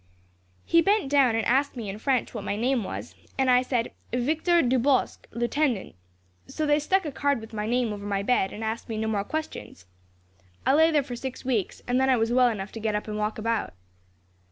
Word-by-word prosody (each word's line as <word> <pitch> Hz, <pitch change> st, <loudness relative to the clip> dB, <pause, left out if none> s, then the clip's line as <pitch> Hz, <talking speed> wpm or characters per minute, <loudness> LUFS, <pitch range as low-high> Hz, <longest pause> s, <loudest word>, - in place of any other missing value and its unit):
"He 335 Hz, -, +4 dB
bent 400 Hz, -5 st, +2 dB
down, 270 Hz, -5 st, +4 dB
and 225 Hz, -1 st, 0 dB
asked 270 Hz, +4 st, +2 dB
me 225 Hz, -3 st, -5 dB
in 195 Hz, +2 st, -5 dB
French 255 Hz, 0 st, 0 dB
what 220 Hz, -4 st, -5 dB
my 200 Hz, -, -2 dB
name 240 Hz, +2 st, +1 dB
was, -, -, -6 dB, 0.2 s
and 265 Hz, -1 st, +3 dB
I 250 Hz, 0 st, +5 dB
said 250 Hz, -2 st, -1 dB, 0.2 s
'Victor 315 Hz, +8 st, +2 dB
Dubosc, 255 Hz, +1 st, +1 dB
lieutenant;' 240 Hz, -1 st, -1 dB, 0.5 s
so 310 Hz, -, -3 dB
they 295 Hz, 0 st, +3 dB
stuck 375 Hz, +5 st, +1 dB
a 300 Hz, -, -3 dB
card 280 Hz, -1 st, 0 dB
with 220 Hz, 0 st, -11 dB
my 210 Hz, 0 st, -3 dB
name 240 Hz, -2 st, +1 dB
over 205 Hz, 0 st, -7 dB
my 200 Hz, -1 st, -1 dB
bed, 200 Hz, -4 st, +1 dB
and 220 Hz, -, -7 dB
asked 220 Hz, +2 st, -4 dB
me 220 Hz, -, -3 dB
no 220 Hz, 0 st, -1 dB
more 205 Hz, -2 st, 0 dB
questions. 310 Hz, -, -6 dB, 0.8 s
I 265 Hz, -, +4 dB
lay 320 Hz, +2 st, +5 dB
there 300 Hz, -3 st, +2 dB
for 250 Hz, -2 st, -6 dB
six 260 Hz, +1 st, -6 dB
weeks, 230 Hz, -7 st, -1 dB
and 250 Hz, +1 st, +2 dB
then 265 Hz, -, +3 dB
I 255 Hz, -, +4 dB
was 225 Hz, +1 st, +1 dB
well 250 Hz, 0 st, +5 dB
enough 200 Hz, -3 st, -5 dB
to 225 Hz, -, -7 dB
get 215 Hz, -1 st, -1 dB
up 210 Hz, -, -3 dB
and 210 Hz, -, -4 dB
walk 210 Hz, +1 st, -1 dB
about. 225 Hz, -, -2 dB
245 Hz, 220 wpm, -26 LUFS, 220-275 Hz, 0.8 s, I